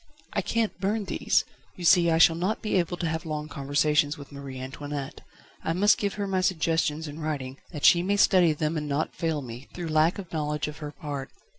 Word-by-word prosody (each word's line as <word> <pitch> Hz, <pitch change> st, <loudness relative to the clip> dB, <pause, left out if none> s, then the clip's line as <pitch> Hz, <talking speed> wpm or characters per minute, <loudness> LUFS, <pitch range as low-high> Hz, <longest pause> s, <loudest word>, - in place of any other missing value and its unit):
"I -, -, +1 dB
can't 225 Hz, -4 st, -1 dB
burn 205 Hz, +2 st, 0 dB
these. -, -, +1 dB, 0.3 s
You 175 Hz, -, -6 dB
see, 170 Hz, 0 st, +6 dB
I 160 Hz, -, +3 dB
shall 165 Hz, 0 st, +6 dB
not 190 Hz, +8 st, -2 dB
be 215 Hz, -, -2 dB
able 175 Hz, 0 st, 0 dB
to 170 Hz, -, -2 dB
have 160 Hz, 0 st, -2 dB
long 150 Hz, -1 st, -4 dB
conversations 145 Hz, +1 st, +1 dB
with 140 Hz, 0 st, -11 dB
Marie 140 Hz, -2 st, -8 dB
Antoinette. 140 Hz, +1 st, -6 dB, 0.4 s
I 165 Hz, -, 0 dB
must 205 Hz, +4 st, +4 dB
give 200 Hz, -1 st, -1 dB
her 205 Hz, -, -2 dB
my 190 Hz, -1 st, 0 dB
suggestions 160 Hz, -3 st, 0 dB
in 150 Hz, +2 st, -8 dB
writing, 140 Hz, -4 st, -4 dB
that 150 Hz, -4 st, -2 dB
she 170 Hz, -, +7 dB
may 200 Hz, +3 st, +1 dB
study 185 Hz, -4 st, +5 dB
them 155 Hz, +1 st, -1 dB
and 150 Hz, -1 st, -3 dB
not 145 Hz, +2 st, -1 dB
fail 160 Hz, -4 st, -1 dB
me, 120 Hz, +2 st, -9 dB
through 175 Hz, -2 st, -4 dB
lack 155 Hz, +2 st, +3 dB
of 185 Hz, -4 st, -8 dB
knowledge 150 Hz, -1 st, -1 dB
of 150 Hz, -, -7 dB
her 150 Hz, -1 st, -6 dB
part." 145 Hz, -4 st, -6 dB
160 Hz, 220 wpm, -27 LUFS, 145-180 Hz, 0.4 s, she